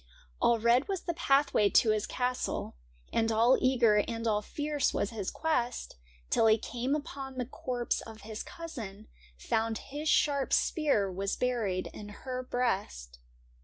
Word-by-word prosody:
All 235 - +4
red 235 +4 +3
was 390 -3 -2
the 340 - -2
pathway 275 -9 +3
to 220 - +5
his 215 -1 0
castle, 250 - -2 0.4
And 225 0 +2
all 230 +4 +5
eager 240 -5 +4
and 230 +2 -1
all 210 -2 +2
fierce 295 +4 -1
was 205 - 0
his 210 -4 -3
quest, 250 -7 -1 0.4
Till 225 - +4
he 220 0 +6
came 245 +5 -2
upon 275 -3 -6
the 250 - -1
corpse 245 -1 -2
of 220 -1 -11
his 215 0 -6
cousin 220 - -8
— - - -25
Found 220 - 0 0.2
his 300 +1 -2
sharp 280 -3 +2
spear 280 - +2
was 195 +2 -2
buried 225 -7 -1
in 205 -1 -9 0.2
her 255 -1 -3
breast. 195 - -2
235 Hz, 160 wpm, -30 LUFS, 215-265 Hz, 0.4 s, he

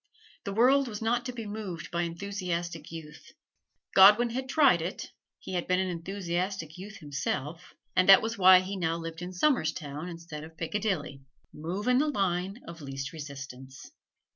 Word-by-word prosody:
The 200 - -3
world 260 +5 +4
was 210 -3 -5
not 240 +3 0
to - - -3
be 235 -2 -7
moved 195 -7 -6
by 170 0 0
enthusiastic 170 -2 -4
youth. 160 -2 -10 0.6
Godwin 210 +5 +7
had 260 +2 -4
tried 270 - +5
it 175 +4 -5 0.3
he - - -8
had 175 -1 -2
been 180 0 +2
an 190 0 0
enthusiastic 175 -1 -3
youth 200 +3 -9
himself, 150 +3 -4 0.2
and 185 +1 +3
that 195 +1 +9
was 225 +1 -2
why 185 -1 +8
he 190 +2 -5
now 165 -3 -1
lived 165 0 -7
in 180 +1 -5
Somerstown 160 - 0
instead 165 -3 -8
of 160 +1 -12
Piccadilly. 165 -6 -2 0.3
Move 175 +8 -4
in 250 0 +4
the 300 - +2
line 195 -4 -1
of 170 -1 -9
least 135 +2 -5
resistance. 135 -3 -9
180 Hz, 165 wpm, -29 LUFS, 160-205 Hz, 0.6 s, that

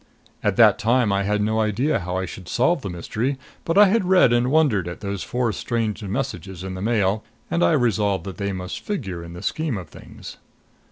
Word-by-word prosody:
At - - +1
that - - +6
time 115 -1 +2
I 100 - +1
had 105 +1 +1
no 110 +1 0
idea 110 +8 +1
how 90 0 -3
I 95 - -1
should 90 -1 -9
solve 135 +6 +2
the 100 - -5
mystery. 110 +10 -2 0.3
But 165 - -1
I 210 - +9
had 210 +2 +2
read 180 -10 +5
and 120 +1 +2
wondered 135 - +2
at 85 - -7
those 100 -2 -4
four 120 -3 -1
strange 115 -2 -2
messages 95 -5 -4
in 95 0 -5
the 95 - -6
Mail, 105 -1 +1 0.3
and 85 +1 +2
I 85 - +4
resolved 105 -5 +1
that 95 -2 -7
they 100 -1 -2
must 90 -1 -5
figure 95 - -4
in 85 0 -9
the 90 - -9
scheme 155 -8 -1
of 90 -5 -8
things. - - -11
105 Hz, 215 wpm, -23 LUFS, 95-125 Hz, 0.3 s, I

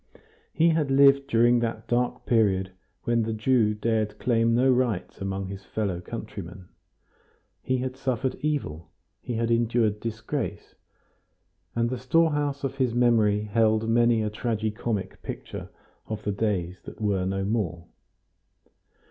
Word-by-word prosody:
He 165 +1 +3
had 160 -3 +1
lived 140 0 +5
during 120 -1 +4
that 115 -1 -3
dark 125 +1 0
period 95 -5 +2 0.3
when 120 0 +2
the 110 0 -1
Jew 110 -1 +2
dared 110 -1 -1
claim 115 -1 +2
no 130 +2 +4
rights 125 -9 -1
among 95 0 -2
his 95 0 -7
fellow 100 -5 -2
countrymen. 95 -4 -8 0.9
He 130 - 0
had 130 0 -3
suffered 130 -1 -1
evil, 110 - -2 0.3
he 120 - -4
had 115 +1 0
endured 115 -2 +2
disgrace, 115 0 -4 1.0
and 115 0 +2
the 125 0 -3
storehouse 145 0 +1
of 135 0 -3
his 125 -4 +1
memory 110 -4 +3
held 110 +1 +2
many 115 -1 +3
a 105 - -2
tragi 110 0 -1
comic 105 -2 -4
picture - - -7 0.4
of 110 -1 -5
the 105 - -1
days 95 -4 -2
that - - -10
were 100 -3 0
no 95 0 -1
more. 95 -6 -2
115 Hz, 140 wpm, -26 LUFS, 105-125 Hz, 1.0 s, lived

